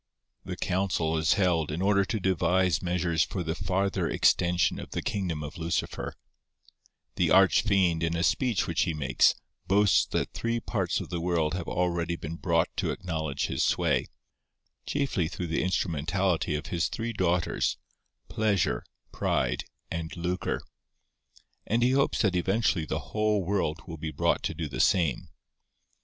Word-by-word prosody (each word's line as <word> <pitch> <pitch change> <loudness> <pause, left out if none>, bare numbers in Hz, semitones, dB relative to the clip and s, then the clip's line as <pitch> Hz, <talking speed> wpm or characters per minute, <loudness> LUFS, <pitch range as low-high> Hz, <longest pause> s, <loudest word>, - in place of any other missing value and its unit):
The - - -6
council 90 -4 0
is 80 0 +3
held 85 -6 +1
in 80 - -3
order 100 +1 +3
to 110 - -2
devise 90 -2 +2
measures 85 -2 0
for 90 +2 -1
the 80 -1 -2
farther 95 +2 -1
extension 85 -1 +2
of - - -8
the - - -3
kingdom 90 -7 -2
of 75 +4 -8
Lucifer. 85 +1 -2 1.0
The - - +2
Arch 95 -1 +6
Fiend, 95 -6 +2
in 85 0 0
a 85 - 0
speech 120 -1 +1
which - - 0
he 80 - 0
makes, 75 -3 +3 0.3
boasts 100 +1 +4
that - - -2
three 115 0 -1
parts 95 -7 -1
of - - -8
the 85 -2 -3
world 85 -3 0
have 90 -2 -4
already 85 -1 0
been 80 0 -6
brought - - +1
to - - 0
acknowledge 80 -5 -2
his - - -1
sway, - - +1 0.8
chiefly 135 - 0
through 90 - -5
the 80 -1 -1
instrumentality 85 -1 0
of 75 0 -4
his 85 -1 +1
three 115 +1 -3
daughters—Pleasure, 95 +2 -1 0.3
Pride, 65 -1 0 0.3
and 85 0 -4
Lucre; 90 +1 -2 1.0
and 115 +2 +2
he 125 - +4
hopes 135 -2 +2
that 100 -4 +2
eventually 95 -2 +1
the - - -5
whole 105 -2 +2
world 85 -5 -1
will 85 -3 -7
be 80 +1 -4
brought - - +1
to - - -3
do 80 - -3
the 70 - -6
same. 80 -9 +2
90 Hz, 155 wpm, -28 LUFS, 80-95 Hz, 1.0 s, Arch